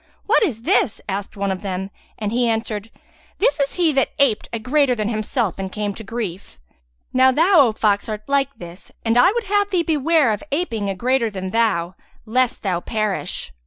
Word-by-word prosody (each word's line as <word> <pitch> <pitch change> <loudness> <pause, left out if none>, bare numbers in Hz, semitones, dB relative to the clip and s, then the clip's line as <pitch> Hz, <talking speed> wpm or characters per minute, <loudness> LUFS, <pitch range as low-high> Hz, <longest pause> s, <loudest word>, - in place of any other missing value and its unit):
"What 435 - +3
is 250 - -1
this?" 230 - +2
asked 200 +1 -4
one 200 0 -1
of 190 0 -4
them; 190 -1 -4 0.3
and 210 -1 -3
he 240 0 +1
answered, 225 -1 -2 0.5
"This 455 -5 +2
is 280 -1 0
he 345 -3 +2
that 270 -1 +2
aped 275 -7 +2
a 230 - -2
greater 255 +3 +2
than 215 -2 -2
himself 215 -3 -2
and 190 -1 -4
came 210 0 -3
to 225 - -9
grief." 195 - -6 0.6
"Now 260 0 +5
thou, 325 0 +5
O - - 0
fox, 210 +1 0
art 215 -1 -4
like 275 -1 +1
this 175 +2 -11
and 225 0 +2
I 355 +10 +6
would 475 +2 -2
have 405 0 +1
thee 365 -4 +1
beware 315 -4 +2
of 210 - -4
aping 230 - -1
a 195 - -2
greater 245 +2 +1
than 190 -2 -5
thou, 195 -6 +1 0.3
lest 250 +2 0
thou 185 -4 0
perish. 210 - -3
225 Hz, 200 wpm, -21 LUFS, 200-275 Hz, 0.6 s, I